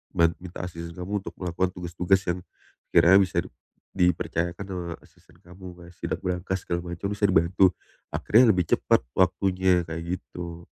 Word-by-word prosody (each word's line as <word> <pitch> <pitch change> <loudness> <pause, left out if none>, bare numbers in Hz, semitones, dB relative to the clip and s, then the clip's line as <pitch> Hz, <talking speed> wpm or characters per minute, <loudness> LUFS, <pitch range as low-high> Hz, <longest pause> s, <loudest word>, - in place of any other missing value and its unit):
ban 85 0 +4
minta 90 0 -7
asisten 85 -1 -8
kamu 95 +3 -3
untuk - - -6
melakukan 90 0 -1
tugas-tugas 90 +2 +1
yang 85 +1 0 0.5
sekiranya 95 +3 +7
bisa 95 - -4
di - - -13 0.6
dipercayakan 85 +2 -3
sama 90 -2 -5 0.2
asisten - - -23
kamu. 90 +2 -14
Kayak 85 0 -13
sidak - - -3
brankas 90 +1 -2
segala 85 0 -1
macam 85 +3 -4
bisa 105 - -8
dibantu, 95 +1 +4 0.5
akhirnya 115 +1 +5
lebih 90 -2 +1
cepat - - +2 0.2
waktunya 95 0 +2
kayak 80 0 -5 0.2
gitu. 85 -1 -8
90 Hz, 155 wpm, -26 LUFS, 85-95 Hz, 0.6 s, sekiranya